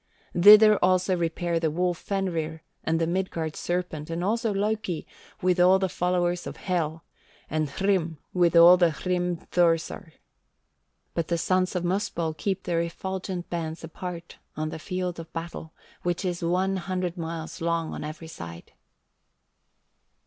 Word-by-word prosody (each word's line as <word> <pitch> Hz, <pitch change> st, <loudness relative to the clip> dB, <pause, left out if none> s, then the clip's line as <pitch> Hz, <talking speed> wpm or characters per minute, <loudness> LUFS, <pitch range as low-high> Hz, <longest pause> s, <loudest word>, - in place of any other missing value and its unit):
Thither 210 Hz, +3 st, +8 dB
also 185 Hz, 0 st, +3 dB
repair 170 Hz, 0 st, -1 dB
the 165 Hz, -1 st, +1 dB
wolf 175 Hz, +2 st, 0 dB
Fenrir 165 Hz, -5 st, -2 dB, 0.2 s
and 165 Hz, 0 st, +1 dB
the 165 Hz, -, +2 dB
Midgard 170 Hz, -3 st, -2 dB
serpent, 175 Hz, -4 st, -3 dB
and 165 Hz, +1 st, -2 dB
also 225 Hz, +3 st, +1 dB
Loki, 205 Hz, -4 st, -1 dB, 0.4 s
with 180 Hz, 0 st, +2 dB
all 180 Hz, +2 st, +6 dB
the 190 Hz, -1 st, 0 dB
followers 175 Hz, 0 st, 0 dB
of -, -, -7 dB
Hel, 165 Hz, -3 st, -2 dB, 0.5 s
and 155 Hz, -1 st, 0 dB
Hrym 175 Hz, -1 st, 0 dB, 0.2 s
with 175 Hz, -2 st, +3 dB
all 170 Hz, +2 st, +9 dB
the 175 Hz, -2 st, +4 dB
Hrimthursar. 175 Hz, 0 st, 0 dB, 1.0 s
But 165 Hz, -1 st, -1 dB
the 170 Hz, -, 0 dB
sons 185 Hz, +2 st, +1 dB
of 180 Hz, -, -1 dB
Muspell 175 Hz, -3 st, -1 dB
keep 190 Hz, +4 st, -2 dB
their 170 Hz, -1 st, 0 dB
effulgent 185 Hz, +1 st, -4 dB
bands 165 Hz, -1 st, -4 dB
apart 170 Hz, +1 st, -7 dB, 0.2 s
on 155 Hz, 0 st, -1 dB
the 160 Hz, -, -6 dB
field 180 Hz, +1 st, -3 dB
of 165 Hz, 0 st, -9 dB
battle, 165 Hz, -1 st, -6 dB, 0.3 s
which 175 Hz, +2 st, -1 dB
is 175 Hz, -1 st, -2 dB
one 185 Hz, +3 st, +1 dB
hundred 180 Hz, -1 st, -2 dB
miles 165 Hz, 0 st, -6 dB
long 165 Hz, -1 st, -1 dB
on -, -, -5 dB
every 155 Hz, +2 st, -7 dB
side. 85 Hz, -, -9 dB
175 Hz, 145 wpm, -26 LUFS, 165-185 Hz, 1.0 s, all